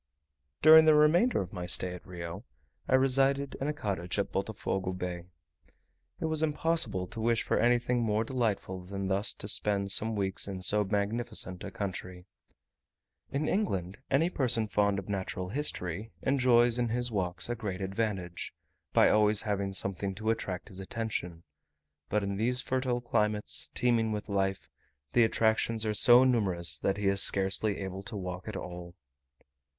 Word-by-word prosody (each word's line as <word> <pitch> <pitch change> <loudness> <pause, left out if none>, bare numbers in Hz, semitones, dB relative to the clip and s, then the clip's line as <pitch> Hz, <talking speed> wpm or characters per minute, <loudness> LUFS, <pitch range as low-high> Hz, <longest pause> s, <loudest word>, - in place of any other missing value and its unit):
During 160 +1 +9
the 155 -1 +6
remainder 165 +11 +4
of 90 - -12
my 90 -2 -5
stay 90 0 +2
at 90 - -10
Rio, 85 +2 -7 0.4
I 130 - +3
resided 135 +1 +2
in 140 - -1
a - - +1
cottage 95 - -4
at 100 - -1
Botofogo 95 -2 -3
Bay. 90 -1 -5 0.9
It - - -3
was 160 -1 +1
impossible 150 - 0
to 110 +5 -8
wish 115 0 +1
for - - 0
anything 120 +1 +2
more 110 -1 +1
delightful 110 -7 -2
than 95 +1 -5
thus 100 +2 +1
to - - -6
spend 100 -1 0
some 110 +2 +2
weeks 95 -1 -2
in 95 -2 -6
so 105 +3 +3
magnificent 105 -1 -2
a 100 - -5
country. 90 -2 -6 1.1
In 145 +3 -1
England 100 - -2
any 160 +6 +2
person 120 -7 +1
fond 100 -1 +1
of 95 - -6
natural 95 -2 -4
history 105 - -2
enjoys 125 -3 +3
in 120 -1 0
his 120 +1 -1
walks 95 -2 -2
a 120 - -2
great 105 -6 -5
advantage, 95 -3 -4 0.4
by - - +5
always 105 0 +4
having 100 -3 -2
something 95 0 -2
to 110 +2 -1
attract 95 -5 -4
his 95 -1 -7
attention; 95 -5 -5 0.7
but 105 0 0
in 100 0 -3
these 125 +4 0
fertile 130 -1 -1
climates, 105 -3 -1
teeming 115 -3 +2
with 105 0 -5
life, 95 -1 -1 0.5
the 120 - +5
attractions 110 0 +1
are 110 - 0
so 120 +4 +7
numerous, 100 -9 +1
that 95 0 -1
he 105 - -3
is 100 0 +4
scarcely 100 +2 +3
able 95 0 -5
to 100 +2 -6
walk 90 -1 -6
at - - -5
all. 90 -1 -8
105 Hz, 165 wpm, -30 LUFS, 95-120 Hz, 1.1 s, During